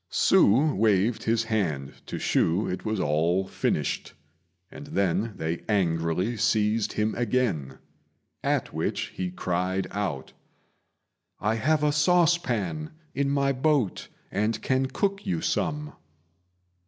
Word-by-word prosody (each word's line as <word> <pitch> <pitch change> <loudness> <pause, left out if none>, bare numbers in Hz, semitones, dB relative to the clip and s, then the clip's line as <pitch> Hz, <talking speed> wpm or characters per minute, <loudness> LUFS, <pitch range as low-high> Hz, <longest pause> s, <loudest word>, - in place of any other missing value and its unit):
Hsü 135 +9 +4
waved 110 +2 +2
his 115 0 +2
hand 85 - -1
to - - -4
shew 85 +6 +1
it 90 - -4
was 110 -2 -1
all 85 +4 +1
finished, - - -2 0.6
and 145 - -10
then 100 - 0
they 80 +1 -3
angrily 90 +2 +1
seized 110 -1 +1
him 105 +1 0
again; 105 - -1 0.7
at - - 0
which - - -2
he 90 -1 -3
cried 90 +1 -1
out, 90 -10 -3 1.1
"I 105 +2 +1
have 150 +7 +1
a 150 - +3
saucepan 150 - +1 0.2
in 140 0 0
my 140 0 +2
boat, 135 -5 0 0.2
and 105 +3 0
can 130 0 +1
cook 200 +7 -1
you 180 -3 0
some." 150 -1 -1
110 Hz, 120 wpm, -26 LUFS, 90-135 Hz, 1.1 s, Hsü